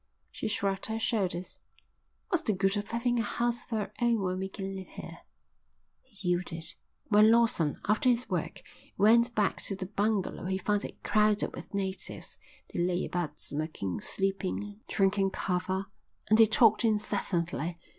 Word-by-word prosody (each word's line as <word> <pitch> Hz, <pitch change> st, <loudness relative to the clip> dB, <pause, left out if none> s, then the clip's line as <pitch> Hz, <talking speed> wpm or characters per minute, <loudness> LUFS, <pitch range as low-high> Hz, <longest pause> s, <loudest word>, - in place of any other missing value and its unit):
She -, -, -4 dB
shrugged 200 Hz, -2 st, -1 dB
her 220 Hz, 0 st, -2 dB
shoulders. 190 Hz, -6 st, -1 dB, 0.7 s
"What's 355 Hz, -4 st, +2 dB
the 220 Hz, -, +1 dB
good 195 Hz, +1 st, +1 dB
of 205 Hz, 0 st, -3 dB
having 240 Hz, +1 st, 0 dB
a -, -, +3 dB
house 240 Hz, +2 st, -1 dB
of -, -, -22 dB
our 210 Hz, -2 st, -2 dB
own 235 Hz, -2 st, +3 dB
when 185 Hz, 0 st, -1 dB
we 190 Hz, 0 st, -3 dB
can 195 Hz, 0 st, -5 dB
live 190 Hz, -1 st, -7 dB
here." -, -, -9 dB, 0.8 s
He 200 Hz, -7 st, -6 dB
yielded. 175 Hz, -1 st, -2 dB, 0.4 s
When 215 Hz, 0 st, +7 dB
Lawson, 225 Hz, -10 st, +3 dB
after 215 Hz, +5 st, +3 dB
his 245 Hz, 0 st, +2 dB
work, -, -, -3 dB, 0.3 s
went 235 Hz, +3 st, +5 dB
back 210 Hz, -2 st, +2 dB
to 195 Hz, -, 0 dB
the 190 Hz, -1 st, -5 dB
bungalow 205 Hz, -1 st, -1 dB
he 190 Hz, +1 st, 0 dB
found 205 Hz, +1 st, 0 dB
it -, -, -10 dB
crowded 210 Hz, 0 st, +2 dB
with -, -, -8 dB
natives. 190 Hz, -1 st, -4 dB, 0.3 s
They -, -, -2 dB
lay 175 Hz, +1 st, +1 dB
about 160 Hz, -4 st, -3 dB
smoking, 145 Hz, -, -3 dB
sleeping, 195 Hz, +2 st, -2 dB
drinking 195 Hz, -1 st, +2 dB
kava; 185 Hz, +1 st, -1 dB, 0.5 s
and 215 Hz, -, +6 dB
they 225 Hz, -, +9 dB
talked 220 Hz, +1 st, +5 dB
incessantly. 180 Hz, -6 st, 0 dB
200 Hz, 160 wpm, -30 LUFS, 185-220 Hz, 0.8 s, they